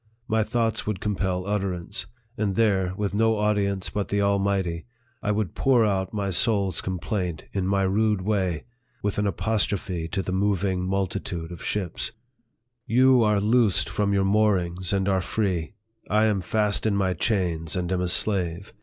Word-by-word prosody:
My 110 -1 +2
thoughts 115 0 0
would 105 -4 -1
compel 95 -3 -1
utterance; 95 -4 -2 0.3
and 105 -4 -1
there, 95 -5 +2
with 100 -1 -2
no 110 +1 +2
audience 100 -2 0
but 100 -1 -2
the 100 - 0
Almighty, 100 -3 0 0.3
I 105 - 0
would 105 -4 -1
pour 125 -4 +3
out 95 -2 0
my 100 -2 -2
soul's 100 -1 +2
complaint, 90 -2 -3
in 95 -2 -1
my 100 0 +2
rude 105 0 +1
way, 95 -6 0 0.4
with 105 -1 -1
an 105 - +1
apostrophe 100 -3 -1
to 95 +4 -2
the 90 - -4
moving 95 -1 0
mul 95 +1 +1
titude 85 -2 -5
of 85 - -9
ships: 95 0 -2 0.4
" 120 0 -52
You 130 -1 +6
are 105 -2 +3
loosed 110 -1 +3
from 105 -1 0
your 100 -1 +2
moorings, 95 -4 +1
and 95 -1 +1
are 95 -1 +2
free; 95 -2 -1 0.4
I 105 +1 +3
am 105 -3 +1
fast 105 +3 0
in 105 - +1
my 95 -2 +1
chains, 85 -4 -1
and 90 -1 -2
am 90 -1 0
a 90 - 0
slave 90 0 0
100 Hz, 170 wpm, -25 LUFS, 90-105 Hz, 0.4 s, You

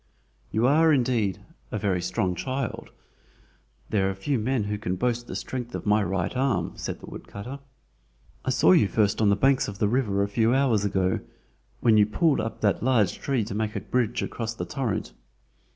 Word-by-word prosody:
"You 110 - +1
are, 160 +4 +5
indeed, 120 - +1 0.3
a - - -2
very 95 -3 0
strong 90 +1 -1
child. 130 +5 -4 1.0
There 95 -3 +2
are 95 - -3
few 120 +7 -1
men 120 +1 0
who 105 0 -3
can 90 -3 -2
boast 120 +3 0
of 120 - -21
the - - -6
strength 125 -2 -5
of - - -5
my 105 +1 +3
right 95 +1 -1
arm!" 135 +1 0
said - - -5
the - - -9
woodcutter. 125 +8 -8 0.8
"I - - -2
saw 90 - +4
you 100 +2 +5
first 105 +1 +1
on 105 - +4
the 100 - +4
banks 135 +5 +3
of 100 - -6
the 105 - +2
river 105 -4 +1
a - - 0
few 115 +4 +2
hours 125 -7 +2
ago, 95 -2 +1 0.6
when 115 -3 +5
you 105 -1 +5
pulled 155 +5 +2
up 110 0 -5
that 100 -2 +2
large 115 -6 +2
tree 135 -5 0
to 105 - -6
make 110 0 -2
a - - 0
bridge 120 -2 -1
across 115 -1 -4
the - - -4
torrent. 125 -7 -3
110 Hz, 200 wpm, -26 LUFS, 100-125 Hz, 1.0 s, are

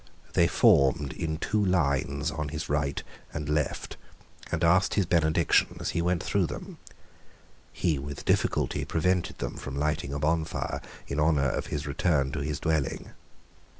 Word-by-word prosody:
They - - +4
formed 70 0 +4
in 80 -1 -3
two 105 +5 0
lines 75 -4 +1
on 75 -2 -3
his 80 +2 -5
right 70 -1 0 0.3
and 75 0 -4
left, 75 -1 -1 0.5
and - - -1
asked 90 +3 +4
his 100 - +2
benediction 80 -2 +2
as - - -2
he 85 - 0
went 90 +1 0
through 95 -4 +1
them. - - -8 0.9
He 80 -6 0
with 70 0 -7
difficulty - - +1
prevented 90 +2 0
them - - -4
from 70 - -6
lighting 75 -1 -1
a 70 - -2
bonfire 80 +2 -1 0.3
in 70 - -2
honour 75 -3 +3
of - - -3
his 75 0 -3
return 70 -2 +1
to 75 - -3
his 75 0 -2
dwelling. 80 -4 -1
75 Hz, 155 wpm, -28 LUFS, 70-85 Hz, 0.9 s, They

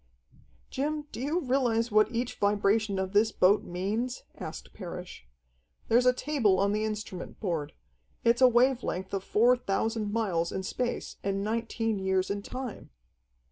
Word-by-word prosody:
"Jim, 295 +3 -1
do - - -7
you 310 +7 0
realize 245 -4 +1
what 215 0 +5
each 240 +1 -2
vibration 205 0 +2
of 190 0 -2
this 215 +2 +4
boat 195 +2 +4
means?" 215 +8 -3 0.2
asked - - -7
Parrish. 180 - -8 0.6
"There's 245 +2 +4
a - - +8
table 250 -7 +1
on 200 +1 +2
the 215 +1 0
instrument 210 -4 -5
board. 165 -7 -2 0.5
It's 235 +2 +3
a 255 - +9
wave 250 +1 +3
length 190 -2 -4
of 195 -1 -1
four 235 +5 +4
thousand 220 -1 -1
miles 185 -7 0
in 190 - -3
space 245 +5 -3
and 195 0 -1
nineteen 225 0 -1
years 190 0 0
in 200 0 -2
time." 250 +2 -7
215 Hz, 155 wpm, -29 LUFS, 195-245 Hz, 0.6 s, a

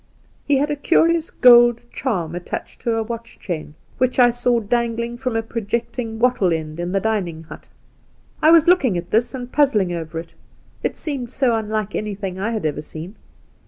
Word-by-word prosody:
' - - -36
He 285 -1 +3
had 290 +2 0
a - - 0
curious 330 +2 +2
gold 240 -1 +6
charm 180 - -2
attached 175 0 -6
to 230 -1 0
a 225 - 0
watch 230 +1 -7
chain, 155 -4 -6 0.2
which 255 0 +1
I 245 -1 +6
saw 245 0 +1
dangling 235 +1 -1
from 245 -1 -3
a 225 - 0
projecting 230 +1 -3
wattle 235 -6 +2
end 160 0 -3
in 175 +1 -3
the 195 - +1
dining 185 -7 -2
hut. 160 - -12 0.7
I 310 - +6
was 330 -1 +6
looking 275 - +4
at 175 0 -6
this, 235 +4 +1
and 250 -1 -7
puzzled 235 -11 +2
over 165 -1 -5
it; 165 +1 -7 0.5
it - - -2
seemed 275 -6 -4
so 255 -2 +1
unlike 215 -2 -2
any 210 -1 -3
thing 190 -2 -5
I 205 +4 -1
had 220 -6 -3
ever 150 -1 -1
seen. 160 +6 -9
225 Hz, 195 wpm, -21 LUFS, 185-250 Hz, 0.7 s, gold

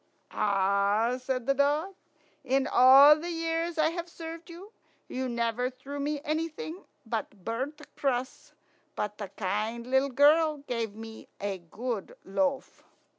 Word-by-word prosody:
"Ah!" 200 +4 +2
said 255 -2 -3
the 275 - +3
dog, 295 +7 +1 0.5
"in 265 +1 +1
all 270 +4 +8
the 330 +3 -5
years 330 0 -2
I've 335 +2 0
served 330 0 -9
you, 360 +5 -11 0.4
you 260 0 -3
never 235 +1 -1
threw 265 +3 -8
me 290 +1 -1
anything 320 +3 -4 0.2
but 220 -4 -5
burnt 260 +7 -3 0.2
crusts; 260 -2 -2 0.4
but 210 0 -3
the 205 -3 -5
kind 215 +4 -3
little 265 +2 +2
girl 295 +2 +4
gave 230 -5 -3
me 225 0 -10
a 200 -2 -3
good 210 +5 -5
loaf." 275 +6 -1
260 Hz, 130 wpm, -29 LUFS, 225-305 Hz, 0.5 s, all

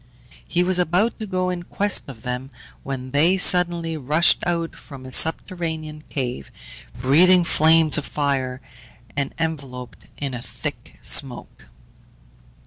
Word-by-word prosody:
He 175 +1 +1
was 180 0 +1
about 180 +8 +1
to 215 - -5
go 185 -1 -1
in 180 -1 -4
quest 200 +3 0
of 125 -5 -11
them, 125 +1 -4 0.3
when 130 -1 -6
they 165 +7 +3
suddenly 175 -3 +2
rushed 150 +4 +3
out 170 -1 -1
from 135 -3 -12
a 130 - -9
subterranean 160 -2 -1
cave, 125 - -4 0.5
breathing 175 +8 +5
flames 160 -1 +4
of 145 - -7
fire, 135 -3 -2 0.5
and 140 -1 -2
enveloped 140 -6 -5 0.2
in 140 -2 -4
a 120 - -5
thick - - -7
smoke. - - +1
155 Hz, 135 wpm, -22 LUFS, 135-175 Hz, 0.5 s, breathing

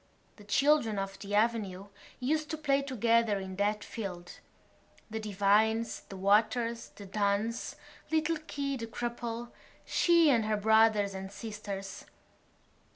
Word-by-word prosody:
The 210 - -14
children 240 0 +3
of 195 0 -4
the 205 0 -3
avenue 205 -3 0 0.3
used 305 +4 0
to 315 - -3
play 280 -2 +2
together 230 -5 +2
in 190 -1 -6
that 205 +1 0
field—the 195 +2 -9
Devines, 215 +2 +2
the 195 - -8
Waters, 230 +4 +2
the 205 - -10
Dunns, 205 +4 -1 0.3
little 320 +1 +1
Keogh 280 -3 -4
the 230 - -4
cripple, 235 0 -4 0.3
she 335 -3 +4
and 230 -4 +2
her 215 0 +1
brothers 220 -1 +4
and 190 0 -6
sisters. 200 -2 -7
220 Hz, 125 wpm, -31 LUFS, 200-240 Hz, 0.3 s, she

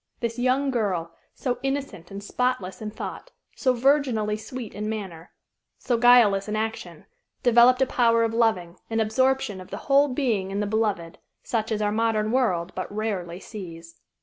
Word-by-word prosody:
This 235 0 -3
young 260 +2 +1
girl, 185 -9 -2 0.2
so 245 -2 -2
innocent 270 -10 -4
and 200 +1 -8
spotless 250 -4 -2
in 215 - -4
thought, 225 - -7 0.3
so 255 -2 +1
virginally 245 -5 +2
sweet 225 +1 -7
in 210 +1 -4
manner, 190 -7 -6 0.5
so 245 - -1
guileless 230 -5 +5
in 210 - -1
action, 215 -7 -4 0.4
developed 245 +2 +6
a - - +2
power 230 -2 +3
of 225 0 0
loving, 190 -7 +1
an 225 0 -1
absorption 220 -2 +1
of 185 - -12
the - - -5
whole 280 +1 +5
being 245 -8 -1
in 195 +1 -3
the 210 - 0
beloved, 205 -6 -1 0.2
such 225 -1 -2
as 215 -1 0
our 205 - +1
modern 215 -1 +1
world 185 -9 0
but 185 - -5
rarely 195 -5 -3
sees. 170 -6 -10
220 Hz, 170 wpm, -25 LUFS, 195-245 Hz, 0.5 s, developed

